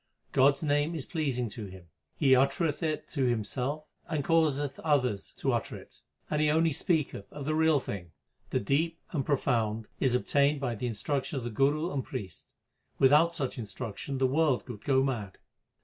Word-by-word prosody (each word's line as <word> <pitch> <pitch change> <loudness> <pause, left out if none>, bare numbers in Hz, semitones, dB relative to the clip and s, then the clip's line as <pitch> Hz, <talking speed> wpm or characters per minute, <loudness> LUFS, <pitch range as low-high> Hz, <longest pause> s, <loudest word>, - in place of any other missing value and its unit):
God 135 +2 +5
s - - -7
name 145 +2 +1
is 150 - -5
pleasing 135 -8 -1
to 105 0 -7
him; 95 -2 -12 0.3
he 135 -3 +5
uttereth 145 +6 +1
it 155 -2 -2
himself 130 +3 -1 0.2
and 155 -4 -1
causeth 145 -4 +2
others 125 -10 0
to - - 0
utter - - -2
it; - - -13 0.3
and 150 0 0
he 155 - +3
only 160 +2 +3
speaketh 150 - -1
of 145 -2 -7
the 155 - 0
Real 160 -1 +4
Thing. 90 -9 -6 0.4
The - - 0
Deep 160 +9 +1
and 145 -6 -1
Profound 115 -6 0
is 130 -3 +2
obtained 140 +3 +2
by 130 -4 -1
the 120 +3 -3
instruction 140 +5 -2
of 130 - -3
the 120 - -4
Guru 145 +8 +1
and 135 -2 -1
priest; 95 -7 -7 0.5
without 150 +5 +5
such 135 -3 -3
instruction 110 +4 -5
the 130 - +2
world 140 -1 +2
would 115 -5 -8
go 135 -1 +3
mad. 110 -8 -3
140 Hz, 180 wpm, -29 LUFS, 120-155 Hz, 0.5 s, God